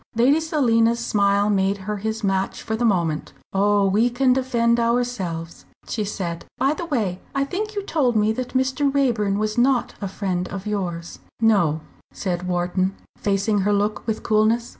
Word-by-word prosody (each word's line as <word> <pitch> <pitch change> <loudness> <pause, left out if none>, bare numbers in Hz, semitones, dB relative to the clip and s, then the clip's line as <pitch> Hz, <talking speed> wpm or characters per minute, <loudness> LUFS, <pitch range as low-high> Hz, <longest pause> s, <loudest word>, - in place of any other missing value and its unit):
Lady 260 +7 +4
Selina's 235 -8 +2
smile 200 -3 +2
made 195 -1 +1
her 205 +2 -4
his 220 +2 -3
match 195 -1 -1
for 220 - -2
the 235 - -2
moment. 170 -8 0 0.2
"Oh! 200 +1 +3
we 215 +5 +3
can 255 +1 +3
defend 240 -2 +1
ourselves!" 230 -9 -2 0.2
she 215 - -2
said. 180 -5 -4
"By 275 +2 +2
the 340 +2 -5
way 210 - -1 0.2
I 275 - +2
think 420 +9 -4
you 405 - -2
told 275 - +1
me 215 0 +3
that 255 +2 -5
Mr. 265 +2 +1
Raeburn 230 -8 +1
was 215 +2 -1
not 255 0 +2
a 200 - -2
friend 185 -2 -2
of 195 0 -6
yours." 175 -5 -4 0.2
"No," 190 -9 +3 0.3
said 180 -2 -3
Wharton, 180 +2 0 0.2
facing 200 +1 0
her 200 +2 +1
look 205 +2 -1
with 220 - -2
coolness. 220 +2 +2
215 Hz, 170 wpm, -22 LUFS, 195-245 Hz, 0.3 s, Lady